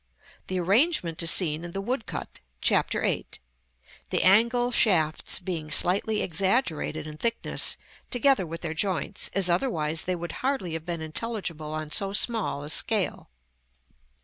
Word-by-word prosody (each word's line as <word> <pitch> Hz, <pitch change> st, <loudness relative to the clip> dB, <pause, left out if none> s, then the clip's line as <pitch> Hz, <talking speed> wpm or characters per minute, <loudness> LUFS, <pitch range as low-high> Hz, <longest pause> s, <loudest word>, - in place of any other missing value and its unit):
The 185 Hz, -1 st, -2 dB
arrangement 190 Hz, -, +2 dB
is 165 Hz, -, +3 dB
seen 165 Hz, -3 st, +3 dB
in 175 Hz, 0 st, -8 dB
the 195 Hz, -, -3 dB
woodcut, 235 Hz, +3 st, -4 dB, 0.2 s
Chap. -, -, +2 dB
VIII.; -, -, -1 dB, 0.8 s
the -, -, +1 dB
angle 235 Hz, +5 st, +4 dB
shafts 165 Hz, -10 st, +2 dB
being 175 Hz, -4 st, -5 dB
slightly 200 Hz, +7 st, +2 dB
exaggerated 175 Hz, -, -1 dB
in 155 Hz, -1 st, -8 dB
thickness, 230 Hz, +6 st, 0 dB, 0.3 s
together 245 Hz, -6 st, +3 dB
with 165 Hz, +1 st, -6 dB
their 160 Hz, -2 st, -3 dB
joints, 190 Hz, +3 st, -1 dB
as 195 Hz, -2 st, +3 dB
otherwise 165 Hz, -, 0 dB
they 185 Hz, -, 0 dB
would 170 Hz, 0 st, -5 dB
hardly 255 Hz, -11 st, -1 dB
have 160 Hz, +1 st, -5 dB
been 170 Hz, -2 st, -2 dB
intelligible 160 Hz, -2 st, -4 dB
on 155 Hz, -1 st, -5 dB
so 195 Hz, +3 st, +1 dB
small 205 Hz, -, 0 dB
a 150 Hz, -, -5 dB
scale. 210 Hz, -, +1 dB
180 Hz, 145 wpm, -26 LUFS, 160-220 Hz, 0.8 s, angle